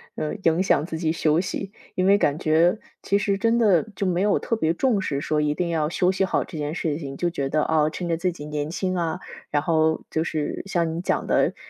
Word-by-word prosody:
呃， 155 +6 -3
影 165 +2 +3
响 155 -5 +2
自 160 -2 -5
己 160 -2 +1
休 160 -1 +2
息。 195 +1 -5 0.2
因 185 - +1
为 200 - +6
感 145 -4 +2
觉， 165 +6 +3 0.2
其 200 - +1
实 200 -1 0
真 230 +1 +2
的 205 -8 +4
就 195 - -2
没 180 0 +1
有 205 0 +3
特 230 - -1
别 160 -7 +1
重 215 +3 +1
视， 140 -6 -2
说 150 +1 0
一 150 0 0
定 175 +1 -1
要 155 -2 0
休 180 +2 +2
息 190 0 0
好 - - 0
这 160 - -8
件 150 +2 -3
事 155 -3 -2
情， 140 -2 -6
就 175 -1 0
觉 140 -5 -2
得， 155 +1 +1
啊， 155 -1 +2
趁 175 +3 -5
着 170 - +1
自 180 +2 0
己 150 -3 -9
年 150 0 -3
轻 185 +2 -2
啊， 170 0 -1 0.3
然 145 -1 0
后 160 -1 +2
就 160 - 0
是 155 -3 -3
像 170 -4 0
你 170 - -3
讲 - - -1
的， - - +2
165 Hz, 265 characters per minute, -24 LUFS, 155-185 Hz, 0.3 s, 为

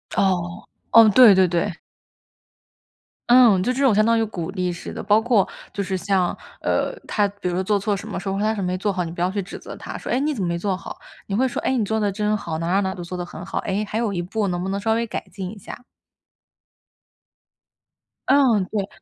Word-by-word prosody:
哦。 175 -3 0 0.3
哦， 225 -1 +8
对 210 -2 +8
对 190 -1 +5
对。 175 +1 -2 1.5
嗯， 240 -6 +6
就 245 +7 0
这 270 +2 -1
种 260 -5 +5
相 215 +1 +4
当 230 0 +3
于 225 - +2
鼓 180 -5 -5
励 185 -2 -2
似 170 - -8
的。 - - -6
包 210 +2 +4
括 225 -4 +2 0.2
就 200 - -3
是 190 0 -3
像， 190 -1 0 0.3
呃， - - 0 0.2
他 205 -1 +1
比 200 -2 -6
如 175 - -1
说 185 +1 0
做 205 +1 +1
错 200 +1 -1
什 200 - -7
么， - - -4
说 195 +1 -3
什 195 - -2
么 - - 0
他 220 +1 +1
什 - - -5
么 - - -1
没 180 0 -1
做 200 +2 -1
好， 185 -2 -2
你 165 - -5
不 170 - -6
要 180 - +2
去 200 +2 -3
指 190 - -8
责 - - -9
他， - - -8
说： - - -6
“哎， 250 - +2
你 300 +2 0
怎 220 - -4
么 180 - 0
没 170 - -1
做 190 +2 -1
好？” 180 - -9 0.3
你 195 - -2
会 260 +4 +2
说： 245 - -4
“哎， 265 - 0
你 215 - +1
做 220 +2 -1
得 205 -1 0
真 210 +1 0
好， 170 -6 -4
哪 165 - -3
哪 190 +3 +2
哪 190 -1 -1
都 175 - -7
做 175 +1 -6
得 180 - -3
很 175 0 -9
好。 - - -3
哎， 205 +2 -2
还 220 - -2
有 230 -3 0
一 185 - -3
步 200 +4 -2
能 175 -1 -2
不 190 - -3
能 195 +1 -2
稍 220 +2 +1
微 235 - 0
改 225 - -5
进 190 0 -6
一 215 - -11
下？” - - -9 2.5
嗯， 255 -8 +4
对。 205 -2 -1
200 Hz, 275 characters per minute, -22 LUFS, 185-220 Hz, 2.5 s, 哦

